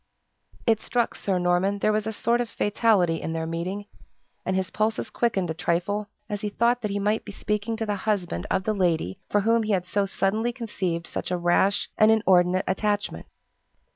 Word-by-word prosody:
It 225 -2 +3
struck 240 -1 0
Sir 195 -2 -1
Norman 180 +3 +2
there 215 +1 +2
was 215 0 0
a - - -1
sort 235 +2 +1
of 240 - -3
fatality 205 -7 +2
in 160 - -3
their 160 0 -2
meeting; 175 +5 -3 0.6
and 185 - -1
his 190 0 -1
pulses 215 +1 -1
quickened 195 -8 0
a - - -1
trifle, 180 +5 -1 0.2
as 205 -1 -4
he 210 - -2
thought 235 +4 +2
that 210 - -2
he 200 - -2
might 210 +2 0
be - - -8
speaking 210 +2 -2
to 225 - -2
the 210 - -1
husband 190 - -2
of 190 - +1
the 215 - 0
lady 170 - 0
for 205 - +2
whom 230 +2 +3
he 215 -1 0
had 180 -2 0
so 200 +2 0
suddenly 215 +5 0
conceived 190 -8 -3
such - - -4
a 180 - 0
rash 175 +3 +2
and 215 - +7
inordinate 185 -4 +4
attachment. 205 +2 -1
200 Hz, 200 wpm, -25 LUFS, 180-215 Hz, 0.6 s, and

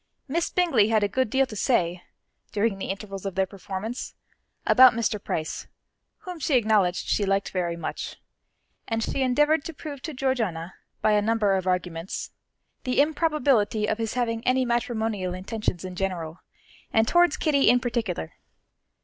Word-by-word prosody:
Miss 335 +5 0
Bingley 305 - +3
had 220 -2 +3
a - - +3
good 260 +4 0
deal 270 +4 +3
to 230 - -9
say, 180 -6 +1 0.5
during 205 -1 0
the - - -4
intervals 195 -1 -5
of 195 -3 -4
their 190 0 +2
performance, 195 +5 -6 0.5
about 255 -1 +8
Mr. 220 -3 -1
Price, 155 -1 -3 0.5
whom 360 -2 -7
she 285 -1 +1
acknowledged 210 -6 +2
she 210 - +1
liked 195 0 0
very 175 -2 -1
much, 170 - -5 0.7
and 225 -1 -1
she 270 - -2
endeavoured 295 +4 +3
to 330 - -6
prove 285 -3 -7
to 315 - -5
Georgiana, 220 -11 -1 0.3
by 215 - +4
a 210 0 +4
number 210 -2 +2
of 190 -1 -2
arguments, 180 -1 -2 0.5
the 255 0 0
improbability 285 -8 +2
of 220 - -1
his 225 0 -2
having 230 -2 -1
any 255 +1 +2
matrimonial 220 -6 -1
intentions 190 -2 -3
in 185 -1 -6
general, 180 -3 -3 0.5
and 220 0 +3
towards 345 -1 +4
Kitty 285 -6 +3
in 245 +1 +5
particular. 225 - -3
220 Hz, 160 wpm, -26 LUFS, 190-260 Hz, 0.7 s, about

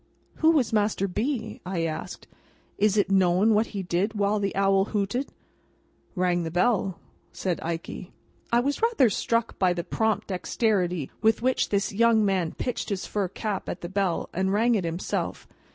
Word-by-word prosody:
"Who 315 - +4
was 285 -9 +2
Master 205 -2 +1
B.?" 220 +3 -3
I 180 -2 -2
asked. 155 -1 -5 0.5
"Is 210 0 +3
it 200 -1 +2
known 190 +3 +4
what 215 +2 +2
he 200 -2 -5
did 185 +5 -1
while 205 +1 +1
the 200 -1 -2
owl 195 0 +3
hooted?" 210 +6 -2 0.9
"Rang 180 -1 +1
the 165 - -3
bell," 185 +1 +1 0.3
said 180 -3 -2
Ikey. 170 +2 -5 0.4
I 235 +1 +4
was 280 - -1
rather 450 - +3
struck 230 +3 -1
by 185 -2 +3
the 175 -1 -3
prompt 220 +2 -1
dexterity 180 - 0
with 225 +1 +2
which 260 0 +1
this 200 0 0
young 225 0 +4
man 185 -4 0
pitched 250 - -3
his 195 -3 -2
fur 205 -3 -1
cap 200 +1 -4
at 175 - -5
the 175 - -5
bell, 190 -3 0
and 190 +2 0
rang 230 +4 +3
it 200 -6 0
himself. 165 +2 -3
200 Hz, 170 wpm, -26 LUFS, 180-220 Hz, 0.9 s, Who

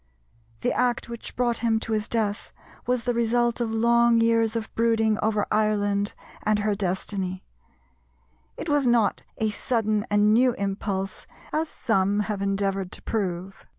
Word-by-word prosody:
The - - +1
act 245 -1 0
which 235 -1 -8
brought 240 -1 0
him 225 -1 +1
to 230 - -5
his 215 0 0
death 215 -3 -2 0.4
was 250 -1 +1
the 245 -1 0
result 235 +1 +1
of 235 - 0
long 235 +1 +4
years 230 0 +2
of 225 -1 -4
brooding 225 -2 +2
over 215 -1 +1
Ireland 205 -1 +1 0.3
and 215 0 +2
her 210 0 0
destiny; 190 -1 -2 1.1
it - - -5
was 290 -4 +2
not 235 -4 +2 0.2
a 220 -1 0
sudden 215 -2 0
and 210 +1 +4
new 250 +2 +4
impulse 195 -1 -3 0.3
as 315 +1 0
some 205 -3 +1
have 210 -1 -3
endeavoured 195 -1 -1
to - - -5
prove. 190 -3 -3
220 Hz, 150 wpm, -25 LUFS, 205-235 Hz, 1.1 s, long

